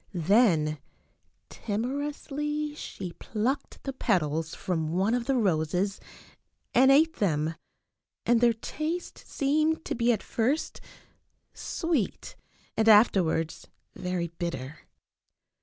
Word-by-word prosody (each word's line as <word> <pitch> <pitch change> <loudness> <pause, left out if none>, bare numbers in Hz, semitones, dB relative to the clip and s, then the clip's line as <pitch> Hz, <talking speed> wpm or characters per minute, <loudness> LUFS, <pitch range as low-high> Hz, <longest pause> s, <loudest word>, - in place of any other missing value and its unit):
Then 170 - +3 0.7
timorously 290 +6 -3
she 190 - -7
plucked 245 - -3
the 270 - -4
petals 165 - 0
from 165 -4 -2
one 195 +5 +1
of 245 -1 0
the 270 - +2
roses 185 -2 0 0.7
and 260 +2 +6
ate 315 +4 +5
them, 160 -5 0 0.7
and 235 0 +3
their 240 -1 +5
taste 310 +9 -4
seemed 310 +3 0
to - - -2
be 235 0 +2
at 220 - -1
first 255 +7 -1 0.7
sweet 325 - -2 0.4
and 220 0 +3
afterwards 185 -7 +4 0.3
very 180 -2 -3
bitter. 165 -4 -6
220 Hz, 105 wpm, -28 LUFS, 170-275 Hz, 0.7 s, and